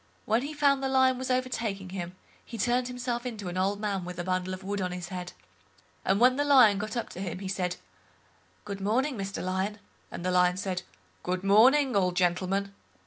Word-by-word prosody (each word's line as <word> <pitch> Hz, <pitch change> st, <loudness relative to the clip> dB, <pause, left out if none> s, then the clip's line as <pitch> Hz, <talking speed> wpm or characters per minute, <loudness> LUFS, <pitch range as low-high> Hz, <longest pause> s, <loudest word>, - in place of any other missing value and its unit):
When 225 Hz, +3 st, +2 dB
he 295 Hz, +3 st, -5 dB
found 280 Hz, -2 st, +3 dB
the 270 Hz, -, -1 dB
Lion 260 Hz, -1 st, +3 dB
was 260 Hz, -, -4 dB
overtaking 235 Hz, -7 st, -1 dB
him, 180 Hz, -1 st, -5 dB, 0.3 s
he 230 Hz, -, -8 dB
turned 245 Hz, +3 st, +1 dB
himself 245 Hz, -1 st, -3 dB
into 215 Hz, -7 st, -5 dB
an 175 Hz, -, -6 dB
old 200 Hz, +2 st, 0 dB
man 200 Hz, -3 st, -2 dB
with 180 Hz, 0 st, -7 dB
a 175 Hz, -, -3 dB
bundle 185 Hz, 0 st, -1 dB
of 185 Hz, 0 st, -6 dB
wood 200 Hz, +1 st, -3 dB
on 180 Hz, -1 st, -2 dB
his 180 Hz, -1 st, -6 dB
head—and 95 Hz, -, -6 dB
when 255 Hz, +2 st, +5 dB
the 290 Hz, -, +2 dB
Lion 250 Hz, -8 st, +6 dB
got 215 Hz, +4 st, -4 dB
up 235 Hz, -, -3 dB
to -, -, -9 dB
him, 180 Hz, -2 st, -4 dB
he 190 Hz, +1 st, -6 dB
said, 185 Hz, -2 st, -2 dB, 0.9 s
"Good 200 Hz, -1 st, -6 dB
morning, 255 Hz, +8 st, +1 dB
Mr 195 Hz, -2 st, -4 dB
Lion", 190 Hz, +3 st, -2 dB, 0.3 s
and 175 Hz, -, -7 dB
the 185 Hz, -, +1 dB
Lion 180 Hz, 0 st, +3 dB
said 185 Hz, -2 st, -2 dB, 0.4 s
"Good 180 Hz, +1 st, -2 dB
morning, 250 Hz, +6 st, +5 dB
old 180 Hz, -2 st, +2 dB
gentleman." 185 Hz, +2 st, 0 dB
195 Hz, 200 wpm, -28 LUFS, 185-245 Hz, 0.9 s, Lion